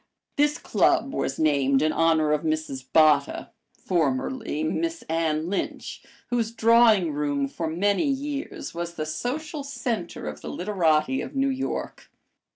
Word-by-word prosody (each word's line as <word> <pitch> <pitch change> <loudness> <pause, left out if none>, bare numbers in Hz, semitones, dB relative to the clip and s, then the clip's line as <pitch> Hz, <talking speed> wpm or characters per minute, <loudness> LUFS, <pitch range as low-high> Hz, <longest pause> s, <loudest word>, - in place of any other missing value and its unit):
This 295 +1 +2
club 275 - +1
was 135 - -2
named 140 -3 +2
in 155 - +2
honor 160 -2 +2
of 150 -1 +1
Mrs. 155 -4 -2
Botta, 150 -3 +3 0.3
formerly 160 - -1
Miss 330 - -2
Anne 160 -1 -1
Lynch, 195 +2 -4 0.3
whose 230 -2 0
drawing 225 -7 +4
room 145 -1 -1
for 165 +4 -4
many 200 - +1
years 280 +1 -4
was 170 0 -5
the 155 - -3
social 285 - -4
center 245 -9 -4
of 75 0 -6
the - - -6
literati 180 +3 +1
of - - -7
New 270 0 +2
York. 265 0 -4
170 Hz, 140 wpm, -25 LUFS, 155-250 Hz, 0.3 s, drawing